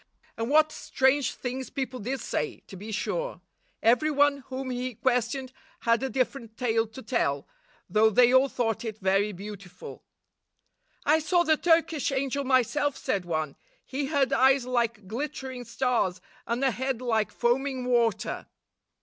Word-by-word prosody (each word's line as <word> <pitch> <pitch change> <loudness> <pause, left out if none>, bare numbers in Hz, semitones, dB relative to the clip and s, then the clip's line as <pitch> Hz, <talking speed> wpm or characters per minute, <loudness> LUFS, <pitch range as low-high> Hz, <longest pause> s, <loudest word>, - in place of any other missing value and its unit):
And 230 +1 -3
what 310 +1 +5
strange 265 +1 +1
things 255 +1 -4
people 260 -2 -4
did 255 +4 -3
say, 150 - -3
to - - -11
be 210 +4 -8
sure! - - -2 0.4
Every 245 +7 +4
one 290 -1 +3
whom 260 0 -4
he 250 -1 -3
questioned 255 +2 0 0.3
had 230 0 +2
a 265 - -1
different 255 -3 -2
tale 225 -2 +1
to 225 +4 -11
tell, 140 - 0 0.4
though 215 +4 +4
they 245 +3 +5
all 260 +1 +5
thought 225 -4 -1
it 220 -2 -5
very 195 +1 +2
beautiful. 195 -2 -9 1.0
"I 310 +2 +5
saw 345 +3 +2
the 315 -2 +4
Turkish 325 -3 +2
angel 275 +1 -1
myself," 270 +2 +2
said 190 -3 -1
one. 155 -4 -2 0.3
"He 270 +1 -3
had 275 -2 +1
eyes 265 -1 +4
like 235 -5 -1
glittering 260 +1 -5
stars, 230 -6 0 0.3
and 235 +3 -1
a 265 - +4
head 260 0 -2
like 225 -4 0
foaming 255 +2 0
water." 230 -4 0
250 Hz, 150 wpm, -27 LUFS, 225-270 Hz, 1.0 s, what